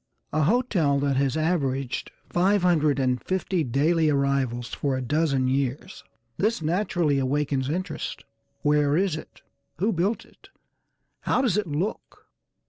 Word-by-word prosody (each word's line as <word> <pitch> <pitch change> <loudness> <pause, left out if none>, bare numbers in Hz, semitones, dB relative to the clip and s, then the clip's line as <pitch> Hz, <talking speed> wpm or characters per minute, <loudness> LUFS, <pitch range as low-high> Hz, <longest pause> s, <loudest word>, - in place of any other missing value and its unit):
A 155 - +2
hotel 180 - +2
that 140 -1 +1
has 135 +1 +1
averaged 140 -6 -1 0.2
five 190 +2 +2
hundred 155 -6 +3
and 125 -2 0
fifty 185 -2 -1
daily 155 +5 +2
arrivals 140 -4 0
for 135 -2 -1
a - - -3
dozen 140 -1 +1
years. 135 +6 -2 0.3
This 220 +3 +1
naturally 165 -3 +1
awakens 135 0 0
interest; 180 +1 -4 0.4
where 150 0 +3
is 185 -3 +1
it? 155 - -11 0.3
Who 205 +7 +1
built 190 +6 -1
it? - - -21 0.7
How 255 - +1
does 225 -9 +2
it 210 -3 0
look? 165 +8 -4
150 Hz, 135 wpm, -25 LUFS, 140-180 Hz, 0.7 s, hundred